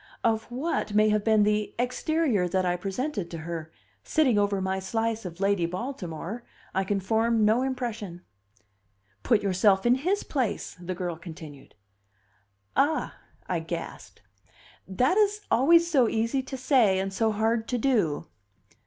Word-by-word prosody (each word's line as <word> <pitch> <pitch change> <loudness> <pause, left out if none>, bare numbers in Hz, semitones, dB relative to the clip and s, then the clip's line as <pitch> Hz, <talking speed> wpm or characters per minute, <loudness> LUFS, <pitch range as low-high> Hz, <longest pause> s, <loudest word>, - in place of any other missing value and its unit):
Of 225 -1 +1
what 250 -4 -2
may 215 0 +5
have 210 -1 +1
been 220 -1 +4
the 210 0 0
exterior 250 - 0
that 185 +1 0
I 175 0 +1
presented 195 - -3
to 170 - -6
her, 160 -1 -6 0.3
sitting 290 -8 +2
over 205 -1 +1
my 190 0 -1
slice 225 +2 -2
of 175 0 -7
Lady 195 -3 +2
Baltimore, 185 - -5 0.3
I 190 - +1
can 195 +1 -1
form 220 +3 +2
no 220 +4 +3
impression. 230 -9 -4 1.0
"Put 230 -4 +2
yourself 190 +1 +3
in 240 - +5
his 355 +11 0
place," 255 -7 -2
the 180 +1 -4
girl 175 -2 -4
continued. 160 - -11 1.0
"Ah," 300 +3 +1 0.3
I - - -1
gasped, - - -7 0.6
"that 250 - +1
is 420 0 +2
always 335 +7 +5
so 265 -9 +3
easy 230 +4 0
to 265 +1 -7
say 250 -7 +3
and 195 0 -2
so 220 +2 +1
hard 225 +2 0
to 250 - -1
do." 215 - +1
215 Hz, 150 wpm, -27 LUFS, 190-250 Hz, 1.0 s, may